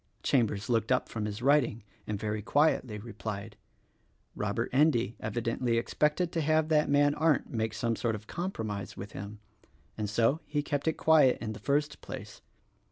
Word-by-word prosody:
Chambers 110 -6 +1
looked 115 -2 +1
up - - +2
from 110 -2 -3
his 105 +3 -5
writing 135 -5 +3 0.2
and 105 -2 -2
very 105 0 -2
quietly 130 -3 +2
replied, 105 -1 -6 0.8
"Robert - - -2
Endy 130 -5 +3
evidently 115 +2 -1
expected 150 +8 +1
to 165 - -1
have 155 +1 +2
that 150 -2 +3
man 145 0 +4
Arndt 155 -1 +1
make 110 -2 -2
some 115 0 0
sort 115 0 -1
of 105 0 -9
compromise 110 - -4
with 100 +2 -7
him, 100 +2 -7 0.6
and 105 -1 -1
so 115 +8 +2
he 145 0 -1
kept 145 +1 -2
it 160 - +3
quiet 155 -6 +5
in 110 -2 -4
the - - -9
first 145 +1 0
place. - - -8
120 Hz, 165 wpm, -30 LUFS, 110-145 Hz, 0.8 s, quiet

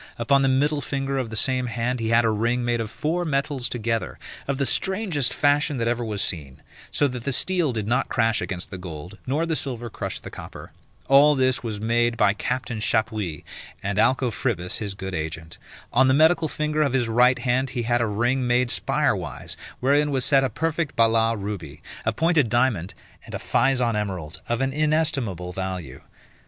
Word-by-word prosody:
Upon 135 +4 +3
the 135 - +3
middle 145 +3 +2
finger 135 0 -2
of 125 -3 -3
the 110 - -5
same 125 +3 +2
hand 120 +2 -2
he 110 -1 -1
had 115 +1 +4
a 110 - +3
ring 120 +3 0
made 120 -1 0
of 110 - -4
four 155 +10 -1
metals 140 -4 -1
together, 115 -1 -2 0.3
of 140 -1 -1
the 140 - +1
strangest 185 - 0
fashion 145 0 +2
that 115 -1 -1
ever 120 0 0
was 105 -3 -1
seen; 70 -6 -4 0.3
so 145 - +2
that 125 -3 -5
the 140 - -1
steel 175 +2 +2
did 110 -3 -3
not 125 +3 +1
crash 115 -1 +1
against 90 -2 -4
the 95 - -6
gold, 90 +2 -8
nor 150 +6 +1
the 165 -1 -1
silver 120 -4 -3
crush - - -4
the - - -10
copper. - - -10 0.4
All 145 +2 +6
this 130 -1 +2
was 110 -3 -4
made 115 +2 +1
by 105 -2 +4
Captain 115 +1 -3
Chappuys, 110 -7 -1 0.4
and 100 +1 -1
Alcofribas 120 -7 +1
his 100 -3 -4
good 95 -1 -6
agent. 80 0 -5 0.3
On 130 +2 +5
the 130 - +4
medical 160 +2 +4
finger 150 0 -1
of 140 -4 +1
his 125 -3 +2
right 125 +3 +4
hand 130 +2 0
he 125 -2 -3
had 120 +1 +1
a 115 - +1
ring 120 +5 0
made 125 0 +2
spire - - +1
wise, - - -6 0.3
wherein 145 +3 +3
was 135 -2 +1
set 135 -2 +4
a 135 - +1
perfect 160 +5 -2
Balas 115 0 +3
ruby, 100 -1 -6 0.2
a 110 - +2
pointed 160 0 +2
diamond, 115 -7 +1 0.3
and - - -7
a - - 0
Physon 125 -4 +1
emerald, 95 -7 -4
of 120 +2 0
an 135 0 0
inestimable 145 - 0
value. 90 -8 -5
120 Hz, 195 wpm, -24 LUFS, 110-135 Hz, 0.4 s, All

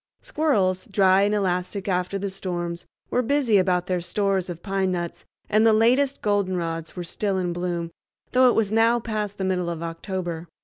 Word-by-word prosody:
Squirrels, 195 -12 +1
dry 190 -1 +4
and 205 +1 +2
elastic 190 +1 -1
after 180 +1 0
the 200 0 -3
storms, 175 -3 -4 0.2
were 250 - +2
busy 250 -4 +2
about 180 -1 +1
their 180 -1 -1
stores 190 +1 0
of 170 -1 -7
pine 195 -2 0
nuts, 175 -2 -4 0.2
and 215 +1 +3
the 225 -1 +5
latest 255 +5 +2
goldenrods 180 -6 -1
were 180 - -4
still 195 +3 -2
in 180 -2 -1
bloom, 175 -1 -3 0.4
though 255 0 +5
it - - +1
was 215 -3 +1
now 230 +2 +4
past 210 -3 -3
the 190 - -2
middle 180 -2 0
of 170 -1 -4
October. 170 0 -4
190 Hz, 180 wpm, -24 LUFS, 175-210 Hz, 0.4 s, the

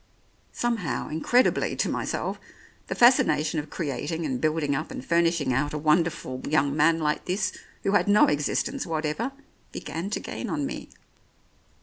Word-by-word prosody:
Somehow, 230 -8 -1
incredibly 240 +11 +2
to - - 0
myself, - - -2 0.5
the - - -3
fascination 160 - +4
of 150 0 -6
creating 155 +1 -3
and 130 -4 -2
building 155 -2 +1
up - - -3
and 130 - -7
furnishing 170 -5 +2
out 145 +4 0
a - - -1
won 155 +3 +4
derful 130 -6 -5
young 145 -2 +2
man 160 +2 +4
like 150 -2 -1
this, 185 +3 0 0.3
who 195 - +1
had 205 - +3
no 205 +1 +6
existence 165 - -1
whatever, 160 - -2 0.4
began 165 +6 -5
to 210 - -2
gain 235 - -5
on 150 -5 -1
me. - - -6
155 Hz, 155 wpm, -26 LUFS, 150-180 Hz, 0.5 s, no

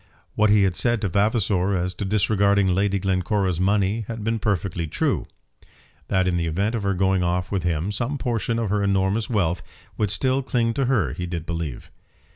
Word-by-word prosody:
What 110 0 +3
he 105 -1 +5
had 95 -2 +1
said 120 -1 +1
to 100 - 0
Vavasor 100 -1 +1
as 90 0 -1
to 100 - -5
disregarding 100 0 +2
Lady 100 +2 +1
Glencora's 95 -1 0
money 100 +3 +1
had 115 -2 -5
been 115 +1 -1
perfectly 95 -5 -1
true. - - -1 0.8
That 95 0 +1
in 90 -1 +1
the 85 -1 -1
event 100 +8 0
of 115 - -1
her 100 -1 0
going 95 0 +2
off 90 +1 -1
with 100 -2 0
him, 85 +2 -1
some 120 +7 -2
portion 115 -3 -1
of 115 -4 -1
her 105 0 +1
enormous 100 +2 +1
wealth 90 -7 0 0.4
would 105 - +1
still 130 +6 +1
cling 120 -3 0
to 135 +2 0
her, 105 - +1
he 90 +3 -4
did 85 -2 -4
believe. 80 -6 -5
100 Hz, 195 wpm, -23 LUFS, 90-110 Hz, 0.8 s, he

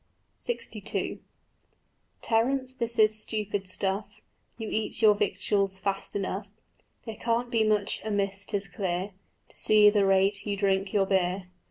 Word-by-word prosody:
LXII 480 - -3 1.0
"Terence, 255 +3 +1
this 235 -2 -3
is 215 0 +4
stupid 205 -3 -3
stuff: 195 +2 -3 0.3
You 225 - -5
eat 215 0 -2
your 215 -1 +8
victuals 200 -1 0
fast 195 +1 -3
enough; 200 +1 -3 0.6
There 225 -2 -6
can't 235 +1 -1
be 225 -2 +3
much 210 -2 +1
amiss, 200 -2 -1
'tis 200 -2 -2
clear, 185 +1 -3 0.4
To - - -19
see 210 -1 +6
the 205 -2 +3
rate 195 +1 +3
you 205 -1 -2
drink 195 -1 +1
your 200 -2 +3
beer. 185 -1 0
205 Hz, 140 wpm, -28 LUFS, 195-220 Hz, 1.0 s, your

